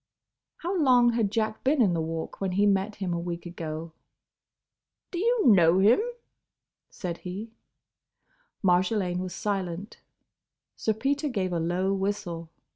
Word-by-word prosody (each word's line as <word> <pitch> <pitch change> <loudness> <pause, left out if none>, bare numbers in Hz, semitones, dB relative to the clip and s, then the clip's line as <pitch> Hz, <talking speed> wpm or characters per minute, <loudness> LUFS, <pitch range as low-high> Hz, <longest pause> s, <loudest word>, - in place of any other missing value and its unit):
How 360 +3 -1
long 245 -4 +5
had 225 -3 +1
Jack 220 0 -1
been 280 +2 +2
in 200 -7 +4
the 165 - 0
Walk 160 +3 -5
when 190 -2 -1
he 200 +2 +3
met 200 +1 +1
him 185 -3 -3
a 170 - -1
week 170 0 -5
ago? 165 -1 -6 1.2
"Do 350 - -3
you 470 +2 +2
know 180 -7 +6
him?" 205 +5 +5 0.9
said 175 -3 -5
he. 200 +5 -6 1.1
Marjolaine 180 0 +2
was 185 -1 -4
silent. 195 -2 -3 0.8
Sir 220 - 0
Peter 280 +6 -1
gave 190 -7 -1
a 170 - 0
low 180 +4 0
whistle. 190 -4 -3
195 Hz, 140 wpm, -27 LUFS, 175-220 Hz, 1.2 s, know